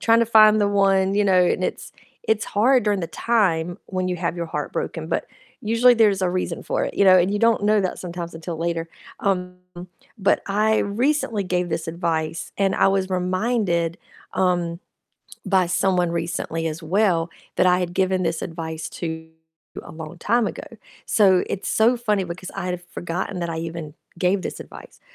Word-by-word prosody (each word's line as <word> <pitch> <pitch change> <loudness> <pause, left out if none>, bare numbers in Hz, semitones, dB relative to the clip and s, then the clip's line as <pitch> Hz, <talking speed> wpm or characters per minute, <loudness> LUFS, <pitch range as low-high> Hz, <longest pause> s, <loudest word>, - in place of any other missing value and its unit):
trying 230 0 +4
to 230 - +2
find 215 -1 +6
the 205 - +3
one, 195 -1 +2
you 205 0 +2
know, 185 -2 +4
and 180 - 0
it's - - -4 0.3
it's 220 -1 +1
hard 245 +4 +3
during 205 -2 +1
the 170 - -3
time 180 -7 0
when 185 -1 -2
you 180 - -2
have 170 0 -2
your 170 - -2
heart - - -4
broken, - - -4
but - - -1 0.4
usually 230 +3 +4
there's 210 -4 +3
a 185 - +2
reason 180 -2 -3
for - - -2
it, - - -5
you 200 - +3
know, 185 -1 +7
and 180 +2 +2
you 205 - 0
don't 230 -1 +3
know 210 0 +4
that 185 -2 -2
sometimes 170 -1 -6
until 165 +1 -6
later, 165 0 -2 0.3
um, 180 -2 -1 0.6
but 200 - +2
I 215 +2 +2
recently 230 0 0
gave 180 -1 -1
this 160 0 -2
advice, 165 -1 -2
and 195 -1 +2
I - - +4
was 195 -1 0
reminded, 185 -2 0 0.4
um, 175 -2 0 0.7
by 190 -2 +3
someone 180 -1 +1
recently 165 -1 -3
as 160 +2 -6
well 175 -1 +1 0.3
that - - +3
I 180 0 +4
had 175 -1 -3
given 185 0 +1
this 165 -1 -1
advice 160 -1 -5
to 160 -1 -6 0.5
a - - -11
long 160 +1 -9
time 230 +5 +1
ago, - - -5 0.4
so 190 -4 +4
it's 195 - -4
so 230 +3 +3
funny 210 -5 0
because 180 +1 -7
I 180 - -4
had 180 -1 -3
forgotten 175 +2 -5
that 170 - -2
I 165 - -4
even 165 -2 -6 0.2
gave 185 +2 +1
this - - -5
advice, - - -12
185 Hz, 190 wpm, -22 LUFS, 170-205 Hz, 0.7 s, know